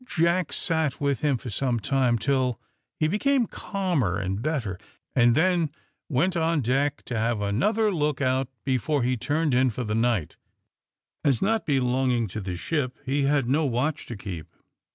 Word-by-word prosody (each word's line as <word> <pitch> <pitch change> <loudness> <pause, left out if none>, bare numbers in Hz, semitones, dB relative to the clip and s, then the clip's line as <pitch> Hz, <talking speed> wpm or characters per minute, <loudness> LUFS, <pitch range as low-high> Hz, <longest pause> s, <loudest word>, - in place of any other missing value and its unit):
Jack 170 0 +1
sat 160 -5 0
with 140 -2 0
him 145 -4 +1
for 120 0 -7
some 120 +2 0
time 125 0 +2
till 125 0 0 0.4
he 155 - +3
became 245 - +2
calmer 175 - -1
and 95 +1 -2
better, 120 - -2 0.4
and 120 -2 +5
then 170 0 +2 0.4
went 165 +6 +1
on 165 -2 +1
deck 135 +4 0
to 125 - -5
have 115 0 0
another 200 - +1
look 150 -4 0
out 130 -1 +1 0.2
before 135 +1 +1
he 125 +1 +1
turned 150 +4 0
in 130 +1 +4
for 125 +2 -4
the 105 -2 -2
night, 115 -7 0 0.9
as, 135 -5 +3
not 220 +2 0
belonging 125 -3 +2
to 105 +3 -5
the 90 -2 -4
ship, 130 - -2
he 140 +2 +1
had 140 -3 +2
no 145 +5 +2
watch 140 +3 -1
to 120 - -5
keep. 90 -5 -6
135 Hz, 170 wpm, -26 LUFS, 120-155 Hz, 0.9 s, and